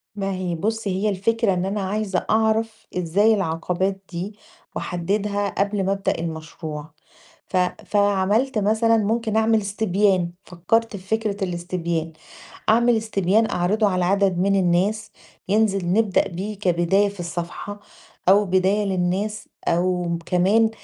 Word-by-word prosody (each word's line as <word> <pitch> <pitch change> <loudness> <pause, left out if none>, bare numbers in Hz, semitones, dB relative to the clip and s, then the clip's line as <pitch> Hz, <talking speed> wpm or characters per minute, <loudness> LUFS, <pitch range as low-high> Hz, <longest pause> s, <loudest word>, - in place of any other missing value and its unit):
ما 195 -1 -2
هي 185 -2 -2
بُصي 220 +5 -2
هي 215 - +3
الفكرة 210 +2 +1
إن 180 0 -1
أنا 200 +2 -2
عايزة 195 -1 -1
أعرف 220 0 +1
إزاي 190 +6 +3
العقبات 185 +1 -1
دي 185 +4 -5 0.4
واحددها 200 +3 -1
قبل 200 0 +1
ما 195 - +1
ابدأ 195 0 -1
المشروع 160 -1 -6 0.6
ف 185 - -1 0.3
فعملت 205 +5 +2
مثلًا 220 +2 +3
ممكن 220 +1 0
أعمل 220 0 +3
استبيان، 200 -3 +1
فكّرت 220 +6 0
في 185 - -12
فكرة 210 -2 -3
الاستبيان، 170 -2 -3 0.6
أعمل 235 +1 +4
استبيان 215 0 +1
أعرضة 205 +5 +1
على 180 -2 0
عدد 195 -1 +2
من 195 +2 +2
الناس 195 +4 +1 0.4
ينزل 195 -4 +2
نبدأ 210 -2 +2
بيه 195 +4 -6
كبداية 190 +2 +2
في 200 -1 -13
الصفحة 175 +4 -5 0.5
أو 205 +2 +6
بداية 190 +2 +2
للناس 195 +3 -1 0.2
أو 180 +1 +1
م 170 -1 -1
كمان 200 +5 +3
195 Hz, 135 wpm, -22 LUFS, 180-215 Hz, 0.6 s, أو